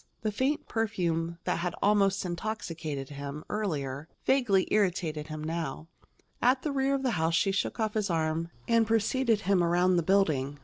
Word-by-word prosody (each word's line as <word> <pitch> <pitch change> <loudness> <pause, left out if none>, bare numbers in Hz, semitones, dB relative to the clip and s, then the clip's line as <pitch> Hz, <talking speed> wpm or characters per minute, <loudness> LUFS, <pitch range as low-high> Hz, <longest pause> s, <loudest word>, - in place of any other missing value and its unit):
The 215 - -1
faint 265 +8 -1
perfume 170 -7 -1
that - - -1
had 175 0 -2
almost 200 -2 +3
intoxicated 170 -7 -4
him, 145 +1 -6
earlier, 150 -8 -3 0.2
vaguely 235 -8 +3
irritated 175 -7 0
him 155 -1 -6
now. 160 -1 -4 0.5
At 255 +2 +3
the 300 - -1
rear 275 0 +1
of 270 - -3
the 255 - +1
house 165 +1 +2
she 195 +4 +2
shook 195 +4 -2
off 215 -1 0
his 210 -2 0
arm 165 0 0 0.2
and 230 -1 +3
preceded 225 +1 +2
him 190 -2 +2
around 175 +2 +3
the - - +3
building. 155 -7 +1
185 Hz, 170 wpm, -29 LUFS, 160-215 Hz, 0.5 s, almost